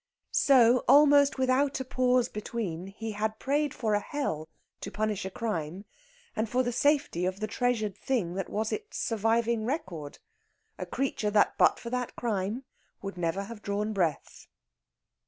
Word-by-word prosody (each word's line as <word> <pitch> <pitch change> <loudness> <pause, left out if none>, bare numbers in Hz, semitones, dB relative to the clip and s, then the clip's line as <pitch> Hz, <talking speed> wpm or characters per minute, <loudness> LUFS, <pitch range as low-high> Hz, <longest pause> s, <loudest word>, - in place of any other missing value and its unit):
So, 250 -3 +5
almost 285 -1 +6
without 260 +2 +2
a 260 - -4
pause 255 -1 +2
between, 200 -5 -4
he 220 +3 -6
had 215 +1 -2
prayed 290 +1 0
for 220 -5 -1
a 205 - +3
hell 180 - -3 0.3
to - - -6
punish 215 -2 -2
a - - -2
crime, 190 -4 -4 0.5
and 220 0 -1
for 255 +3 +2
the 245 - -1
safety 285 - +1
of 185 +1 -3
the 215 - -1
treasured 215 -3 -1
thing 220 -10 -1
that 190 0 -4
was 215 +1 -2
its 430 0 -5
surviving 225 +1 +1
record 185 - -4 0.6
a - - -4
creature 260 -5 -1
that 205 0 +3
but - - +5
for 235 - -7
that 250 -1 -2
crime 215 +2 -2 0.4
would 195 0 -5
never 175 +2 -1
have 210 +1 -9
drawn 210 +2 -2
breath. 170 -7 -2
220 Hz, 160 wpm, -29 LUFS, 200-255 Hz, 0.6 s, almost